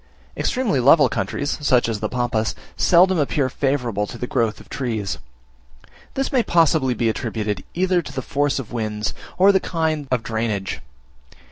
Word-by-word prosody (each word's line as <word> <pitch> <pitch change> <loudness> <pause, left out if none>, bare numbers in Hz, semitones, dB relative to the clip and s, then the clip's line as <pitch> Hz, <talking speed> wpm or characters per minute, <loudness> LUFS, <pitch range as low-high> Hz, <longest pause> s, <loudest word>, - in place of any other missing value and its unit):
Extremely 245 - 0
level 145 +5 +6
countries, 145 +2 -2
such 125 -5 +3
as 110 -2 -2
the 110 - -2
Pampas, 120 -3 -1 0.2
seldom 180 0 +4
appear 140 -2 +1
favourable 125 -7 -1
to 120 - -8
the 125 - -3
growth 115 -3 0
of - - -15
trees. 110 -7 -3 1.0
This 270 0 -1
may 255 - +3
possibly 160 - +2
be 115 - 0
attributed 105 -3 -2
either 180 0 +2
to 155 - -9
the 130 -2 -4
force 145 +2 0
of 135 -5 -5
the - - -13
winds, 110 -2 -2 0.2
or 190 +2 +6
the 190 - +3
kind 160 -5 -2
of 125 -3 0
drainage. 110 -4 -2
130 Hz, 165 wpm, -22 LUFS, 110-160 Hz, 1.0 s, level